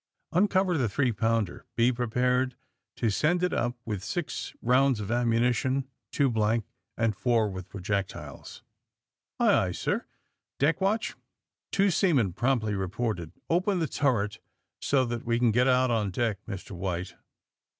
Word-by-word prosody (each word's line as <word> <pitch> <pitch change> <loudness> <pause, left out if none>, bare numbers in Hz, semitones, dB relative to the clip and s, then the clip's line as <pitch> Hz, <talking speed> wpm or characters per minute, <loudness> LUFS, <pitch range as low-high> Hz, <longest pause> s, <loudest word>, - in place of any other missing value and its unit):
*' - - -47
Uncover 185 0 +3
tlie 130 -8 +1
three 130 +4 +1
pounder. 115 -2 -1
Be 120 +2 +4
prepared 125 +1 0 0.4
to - - -3
©end 155 - +2
it 180 - +2
np, 120 +1 0
with 105 -4 -3
six 165 - -4
rounds 130 0 +3
of 105 0 -4
ammunition 120 +3 +1 0.2
two 140 - +2
blank 110 -2 +1 0.3
and 115 -2 +1
four 115 0 +2
with 95 -1 -7
projectile!'* 100 0 -3 1.0
^*Aye, - - +4
aye, - - -2
sir." - - -2 0.5
*'Deck 150 +6 +2
watch 210 +4 +1
f - - -20 0.5
Two 200 0 +3
seaman 140 - +2
promptly 120 -2 +1
reported. 95 -2 -2 0.2
Open 185 +4 +1
the 165 - +1
turret 110 -8 0 0.4
so 135 -2 +2
that 120 -1 -4
we 115 0 +1
can 120 -1 +3
get 125 +4 +3
out 130 -1 +3
on 110 -3 +1
deck. 110 +1 -1
Mr. 100 -3 -7
White!'' 90 -1 -3
120 Hz, 150 wpm, -28 LUFS, 105-135 Hz, 1.0 s, Be